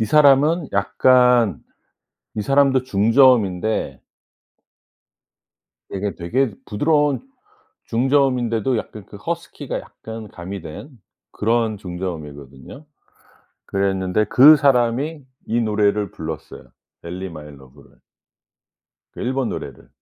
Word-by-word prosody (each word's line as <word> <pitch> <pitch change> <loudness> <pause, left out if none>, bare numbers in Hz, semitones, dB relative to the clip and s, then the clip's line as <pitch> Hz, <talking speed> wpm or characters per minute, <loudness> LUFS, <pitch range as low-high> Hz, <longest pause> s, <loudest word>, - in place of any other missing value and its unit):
이 110 - +2
사람은 150 +3 +4
약간 120 - +3 0.7
이 105 - -2
사람도 135 0 +3
중저음인데 110 -3 +2 1.9
이게 100 +1 -3
되게 110 +6 -1
부드러운 145 +5 +1 0.6
중저음인데도 125 -2 +1
약간 105 -2 -8
그 100 - -12
허스키가 170 +9 -5
약간 110 -1 -10
가미된 90 - -8 0.4
그런 115 0 0
중저음이거든요. 80 - -8 0.8
그랬는데 95 +1 0
그 140 +8 +8
사람이 140 +2 +1 0.2
이 120 +1 0
노래를 105 -2 0
불렀어요 80 -1 -8 0.3
엘리 90 +2 -6
마이 75 -2 -10
러브를. 70 +1 -19 1.2
그 - - -9
일본 130 0 -1
노래를. - - -8
110 Hz, 235 characters per minute, -20 LUFS, 95-135 Hz, 1.9 s, 그